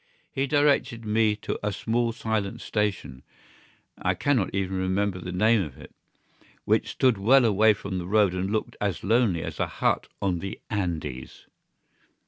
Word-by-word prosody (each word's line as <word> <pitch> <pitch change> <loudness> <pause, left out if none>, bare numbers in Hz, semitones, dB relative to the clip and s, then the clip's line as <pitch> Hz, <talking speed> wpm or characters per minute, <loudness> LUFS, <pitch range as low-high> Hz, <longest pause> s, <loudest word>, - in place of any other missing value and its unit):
He 135 +1 -1
directed 140 -5 +2
me 110 0 +2
to - - -3
a 105 - -1
small 115 +4 0
silent 110 -3 -3
station 100 - -2 0.8
(I - - +1
cannot 130 -9 +1
even 95 -1 -2
remember 95 +1 0
the 90 0 -6
name 110 +4 +3
of 75 -7 -6
it) - - -13 0.7
which - - +2
stood 125 -6 +2
well 125 +6 +5
away 110 0 +4
from 95 -1 -5
the 90 - -6
road 105 -2 +3
and 95 +1 -2
looked 110 +1 -2
as 100 -4 -2
lonely 105 -5 +2
as - - -6
a - - +1
hut - - 0
on 95 -3 0
the 95 +2 -6
Andes. 85 - -4
105 Hz, 160 wpm, -26 LUFS, 95-115 Hz, 0.8 s, well